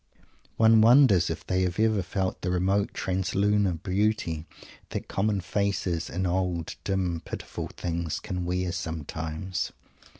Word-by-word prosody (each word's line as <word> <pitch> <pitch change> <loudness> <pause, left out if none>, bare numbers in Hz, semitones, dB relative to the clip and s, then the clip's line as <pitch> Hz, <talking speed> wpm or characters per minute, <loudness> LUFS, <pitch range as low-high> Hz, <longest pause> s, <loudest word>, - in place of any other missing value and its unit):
One 110 0 +6
wonders 115 - +6
if 80 -1 -4
they 95 0 +1
have 90 +1 -1
ever 110 -2 +3
felt 95 +1 -2
the 90 - -1
remote 95 +3 +1
translunar 95 -1 0
beauty 95 -5 0 0.4
that - - -4
common 100 0 0
faces 90 -3 -1
and 95 +2 -2
old, 90 -2 -1
dim, 90 -4 -1
pitiful - - -6
things 85 -2 -3
can 90 -1 -4
wear 90 0 -1
sometimes. 80 +1 -4
90 Hz, 130 wpm, -27 LUFS, 85-100 Hz, 0.4 s, One